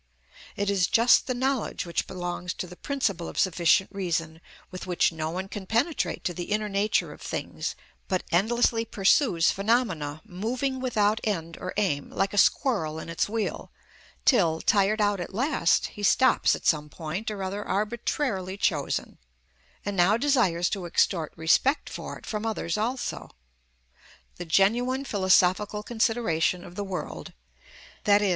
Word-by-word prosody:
It 200 0 0
is 185 -3 +2
just 230 +2 +4
the 255 - -1
knowledge 260 -4 -1
which 170 - -2
belongs 180 0 -4
to - - -4
the 180 0 -11
principle 200 -9 -2
of - - -10
sufficient 185 0 +3
reason, 165 -4 -2 0.3
with 185 0 -7
which 180 -1 +2
no 160 -1 -3
one 185 +3 -4
can 195 -1 -7
penetrate 250 - 0
to 175 - -1
the 175 +1 -5
inner 210 +2 -1
nature 205 +1 0
of - - -16
things, - - -4 0.3
but 185 -1 -1
endlessly 225 +5 +2
pursues 195 - +3
phenomena, 195 -9 0
moving 250 +8 -2
without 220 -4 +1
end 170 -6 -2
or 185 - -5
aim, 175 -9 0
like 195 +1 -1
a 205 - +3
squirrel 195 - +2
in 160 - -7
its 165 +4 -1
wheel, 220 0 -3 0.5
till, 170 - +4
tired 205 +3 +2
out 205 -1 +2
at 175 +2 -6
last, 250 - +2
he 210 - -10
stops 260 +6 +4
at - - -10
some 150 -2 +2
point 170 +9 -5
or 205 -2 -4
other 200 +2 -3
arbitrarily 210 -2 -2
chosen, 155 -9 -1 0.7
and 205 -1 -2
now 190 +4 +4
desires 230 -11 +2
to 195 -4 -3
extort 170 -1 +1
respect 165 - +2
for - - -6
it - - -15
from 210 -1 -4
others 220 -7 -2
also. 240 +5 -3 1.1
The 175 - -6
genuine 240 +10 +2
philosophical 195 0 +2
consideration 220 -8 0
of 175 - -11
the 205 - -4
world, 190 -2 -6 0.7
_i.e. 205 -1 +4
200 Hz, 155 wpm, -26 LUFS, 175-225 Hz, 1.1 s, just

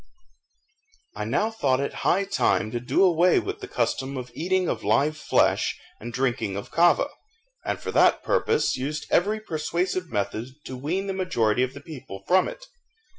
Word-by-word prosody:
I - - -3
now 220 +1 0
thought 135 -12 +1
it 140 - -2
high 195 +3 +3
time 195 - +1
to 120 - -2
do 125 +10 +2
away 180 -1 +4
the - - -3
custom 135 +1 -1
of 125 -1 -6
eating 185 +2 0
of 110 - -2
live 140 +9 +2
flesh 155 - +1 0.2
and 120 +2 -7
drinking 120 -5 -1
of 100 - -7
kava, 175 +2 +4 0.5
and - - -2
for - - -4
that - - +4
purpose 450 0 +1
used 150 +4 -3
every 210 +4 +2
persuasive 175 0 -2
method 110 +5 -3
to 130 - -6
wean 165 +10 -2
the 195 - -2
majority 125 - +1
of 130 0 -1
the - - -9
people 125 - -9
from 185 +1 +4
it. - - -8
155 Hz, 170 wpm, -25 LUFS, 125-185 Hz, 0.5 s, away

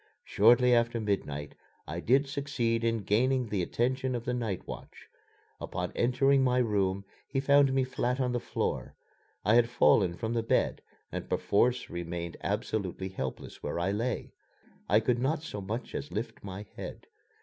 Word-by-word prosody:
Shortly 120 +4 +5
after 115 0 +2
midnight 75 -9 -2 0.3
I 85 +3 -4
did 135 +9 +3
succeed 135 -5 -1
in 115 -2 0
gaining 125 +5 +2
the 100 -3 0
attention 130 +7 0
of 120 -1 -4
the 125 - -1
night 115 -7 -2
watch. - - -9 0.5
Upon 90 0 -4
entering 135 +3 +3
my 125 -1 +2
room 100 -5 +1 0.2
he 135 - -1
found 140 0 +5
me 135 0 +2
flat 125 0 -1
on 125 -2 +1
the 120 - 0
floor. - - -3 0.5
I 105 - +4
had 120 0 +5
fallen 95 -6 +4
from 115 0 -2
the 115 - +1
bed 115 - +1 0.3
and - - -5
perforce 125 +5 +2
remained 85 0 -4
absolutely 95 -3 -2
helpless 95 - -6
where 75 - -3
I 90 +3 0
lay. 115 +5 -2 0.6
I 105 +3 +5
could 120 +1 +1
not 150 +5 0
so 105 -10 -5
much 110 +5 -5
as 145 - -5
lift 110 +3 -5
my 100 +1 -7
head. - - -7
115 Hz, 165 wpm, -30 LUFS, 100-125 Hz, 0.6 s, Shortly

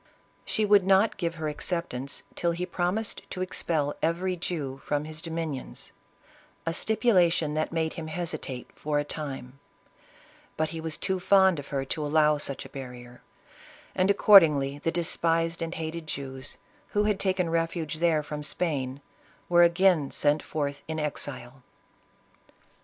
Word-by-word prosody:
She 215 - +1
would 205 -1 +6
not 195 +3 +4
give 170 -2 -2
her 160 -1 -3
acceptance 150 -4 -3
till 170 -1 0
he 175 +2 -2
promised 180 +4 -1
to 185 - -3
expel 155 -5 -1
every 175 +3 0
Jew 145 -7 -4
from 145 0 -1
his 155 0 -6
domin 165 -2 -3
ions— - - -7 0.7
a 165 - 0
stipulation 180 -7 +2
that 155 +1 -1
made 160 -1 -1
him 160 -1 -6
hesitate 155 -6 -4
for 150 0 -2
a 145 - +2
time; 140 -3 -6 1.0
but 155 0 0
he 165 0 -5
was 160 -1 -1
too 190 0 -1
fond 190 -2 +5
of 140 - -8
her 135 -2 -2
to 150 +3 -2
allow 150 0 +3
such 140 -2 -3
a - - -10
barrier, 125 -2 -9 0.7
and 185 +1 +2
accordingly 155 -9 +6
fhe 165 - +1
despised 165 0 0
and 165 +1 -3
hated 160 0 -5
Jews, 135 -2 -6 0.4
who 210 - +3
had 210 -2 +1
taken 185 -3 +1
refuge 165 -1 -1
there 165 -3 +3
from 150 0 -5
Spain, 145 -4 -2 0.5
were 175 0 +6
again 170 -4 +4
sent 145 +1 +2
forth 145 -2 -3
in 160 0 -3
exile. 135 -4 -4
160 Hz, 150 wpm, -27 LUFS, 145-175 Hz, 1.0 s, would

